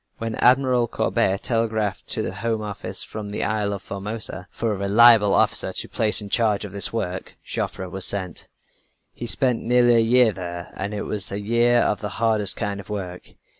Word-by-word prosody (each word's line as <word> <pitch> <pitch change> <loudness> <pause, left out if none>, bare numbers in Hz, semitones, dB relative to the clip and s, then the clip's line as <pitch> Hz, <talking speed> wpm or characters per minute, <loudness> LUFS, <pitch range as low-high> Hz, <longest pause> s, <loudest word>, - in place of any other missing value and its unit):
When 115 0 -4
Admiral 125 -1 +3
Courbet 95 -3 0
telegraphed 110 -4 -1
to - - -2
the - - -4
Home 110 +2 -2
Office 105 -1 -3
from 105 -1 -7
the 105 - -3
Isle 105 -1 -1
of 100 -1 -5
Formosa 100 -1 -4
for 115 -2 -2
a - - -2
reliable 105 +1 +5
officer - - +2
to - - -2
place 110 -1 +1
in 100 - -8
charge 105 -3 +1
of 100 - -8
this 100 0 +1
work, 95 -5 -4
Joffre 95 - -4
was 95 +1 -2
sent. 95 -4 -4 0.7
He 120 - -7
spent 125 -1 +1
nearly 120 0 +4
a - - +5
year 120 +1 +4
there 85 -2 -7
and 100 +2 -4
it 105 - -3
was 105 -2 -3
a 100 - -3
year 120 +3 +3
of 105 - 0
the 105 - -3
hardest 110 -3 +2
kind 100 -1 -3
of 100 - -11
work. 90 -4 -6
105 Hz, 195 wpm, -23 LUFS, 100-115 Hz, 0.7 s, reliable